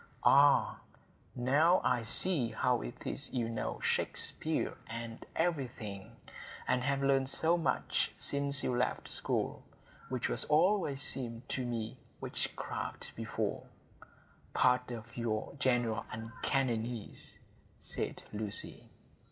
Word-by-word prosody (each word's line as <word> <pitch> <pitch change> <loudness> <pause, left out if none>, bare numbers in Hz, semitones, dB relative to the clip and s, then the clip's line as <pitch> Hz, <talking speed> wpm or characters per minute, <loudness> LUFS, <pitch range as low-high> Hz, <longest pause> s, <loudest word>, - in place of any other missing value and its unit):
"Ah, 140 +1 +6 0.6
now 150 +9 +4
I 125 -1 +2
see 130 - +2
how - - +1
it - - -8
is - - -2
you 120 -3 0
know 115 -1 -3
Shakespeare - - 0
and 115 +1 -6
everything, 125 - -2 0.5
and 125 - +2
have 140 +1 0
learned 135 -1 +3
so 165 +5 +3
much 170 - 0
since 140 -1 +1
you 125 - +1
left 125 +1 0
school; - - 0 0.5
which 130 -2 -1 0.2
always 150 -3 +3
seemed 120 -3 -2
to 130 - -1
me 115 -2 -3 0.2
witchcraft - - -4
before,—part 125 0 -2
of 120 -1 -7
your 110 -2 -2
general 120 -5 +2
uncanniness," 115 0 -2 0.4
said - - -4
Lucy. 105 -1 +1
125 Hz, 105 wpm, -33 LUFS, 115-140 Hz, 0.6 s, Ah